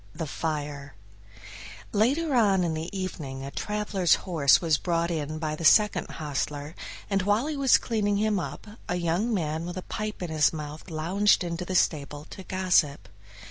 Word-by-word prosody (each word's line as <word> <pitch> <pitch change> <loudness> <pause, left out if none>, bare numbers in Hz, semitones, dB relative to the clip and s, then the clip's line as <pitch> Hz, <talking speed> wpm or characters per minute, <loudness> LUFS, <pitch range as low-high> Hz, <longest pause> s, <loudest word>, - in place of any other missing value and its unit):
16 - - -17
The 160 - -3
Fire 145 -3 -4 1.0
Later 275 +9 +2
on 200 -6 +4
in 165 -2 0
the 160 +1 -4
evening 155 -9 -5
a 140 - -6
traveler's 210 -3 +1
horse 155 -7 +4
was 160 -3 +1
brought 170 -1 0
in 155 -1 -3
by 155 -1 -2
the 165 - -7
second 210 +5 +5
hostler, 145 0 -4 0.3
and 195 -1 +1
while 205 +6 +2
he 305 0 -2
was 275 -2 +5
cleaning 205 -3 0
him 210 -1 +1
a 205 +1 -6
young 175 +6 0
man 160 -5 -1
with 175 +1 -5
a 185 - -5
pipe 215 -3 -5
in 170 - -4
his 155 -1 +3
mouth 150 +2 -7
lounged 180 +6 +2
into 170 +1 -4
the 185 - -3
stable 150 -3 0
to 195 - -8
gossip. 175 - +1
175 Hz, 175 wpm, -27 LUFS, 155-205 Hz, 1.0 s, second